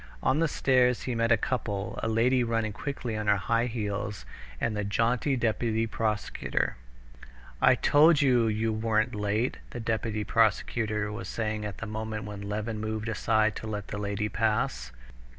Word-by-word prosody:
On 135 +4 +2
the 165 - +3
stairs 125 -4 +2
he 125 - -2
met 115 0 +1
a 115 - +6
couple—a 105 -3 -2
lady 120 +3 +3
running 115 -2 -1
quickly 125 -2 -4
on 105 -1 -3
her 100 0 +4
high 115 +5 +1
heels 105 -3 -3 0.3
and 110 - -1
the 105 - -1
jaunty 115 +6 +1
deputy 115 -1 0
prosecutor. 110 -1 -1 0.9
"I - - +6
told 150 +1 +5
you 125 -5 +4
you 110 +1 0
weren't 110 0 +1
late," 105 +3 -1
the 120 - -6
deputy 110 -1 -1
prosecutor 110 -1 +1
was 105 -3 -6
saying 110 -1 -2
at 100 -2 -5
the - - -5
moment 110 0 -4
when 105 -1 -7
Levin 105 +1 -3
moved 110 +1 -3
aside 110 0 +1
to 110 - -6
let 105 -2 -5
the 105 - -4
lady 100 +1 -1
pass. 105 - -1
110 Hz, 165 wpm, -28 LUFS, 105-115 Hz, 0.9 s, a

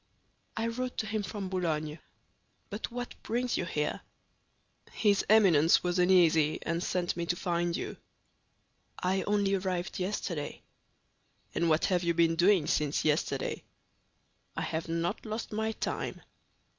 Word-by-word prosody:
"I 225 - 0
wrote 250 +2 -3
to - - -1
him 215 0 -1
from 200 0 -5
Boulogne. 155 -4 -2 0.7
But 205 +2 -4
what 245 0 -5
brings 245 +2 -1
you - - -1
here?" - - -2 0.9
"His 205 -2 +3
Eminence 180 -8 +6
was 180 0 0
uneasy, 170 -4 +4
and 170 +1 -1
sent 180 -1 -1
me 170 -1 -3
to 175 - +1
find 175 -1 -1
you." - - -5 1.0
"I 190 +1 0
only 205 -1 +2
arrived 185 -2 -2
yesterday." 180 -5 -3 0.9
"And 170 0 +1
what 155 0 +3
have 180 -2 +1
you 170 -1 +1
been 165 0 +3
doing 180 -1 +4
since 150 -1 0
yesterday?" 150 0 0 1.0
"I - - -1
have 160 +1 -3
not 165 +1 -2
lost 220 +1 -5
my 220 +1 -1
time." - - -3
180 Hz, 140 wpm, -30 LUFS, 165-205 Hz, 1.0 s, Eminence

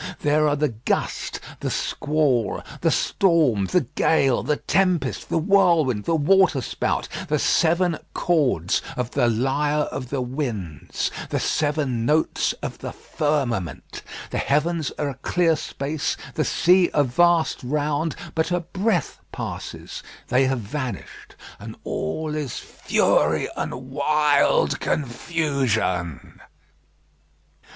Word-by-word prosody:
There 150 +1 +3
are 145 - +2
the 150 0 +1
gust, 115 +1 -2 0.2
the - - -2
squall, 145 -6 0 0.2
the - - +2
storm, 155 - +2
the 180 - +2
gale, 135 -7 +2
the 150 -1 0
tempest, 180 -9 0
the - - +1
whirlwind, 165 - +3
the 165 - +2
waterspout 160 -3 +2 0.2
the - - +1
seven 170 0 +2 0.2
chords 135 - +1 0.2
of 125 -1 -2
the 130 -4 +2
lyre 140 +6 +1
of 130 -2 -5
the 140 - -2
winds, 120 - -3 0.2
the - - -1
seven 145 -6 0
notes 150 +6 +1
of - - -5
the - - -5
firmament. 130 - -2 0.3
The - - -1
heavens 155 +2 0
are 145 - -1
a - - -4
clear 165 +5 +1
space, 145 0 -3 0.2
the 155 - 0
sea 180 +1 +4
a 145 - +5
vast 165 +6 +2
round; 150 +3 -1 0.2
but 160 0 0
a 175 -1 0
breath 185 - -1
passes, - - -6 0.3
they 130 +2 +4
have 130 -2 -1
vanished, 130 +3 -6 0.2
and - - -8
all 150 - -3
is 150 -5 -3
fury 75 +1 +1
and 130 +2 -5
wild 150 +1 +2
confusion. 130 - -1
145 Hz, 120 wpm, -23 LUFS, 125-160 Hz, 0.3 s, a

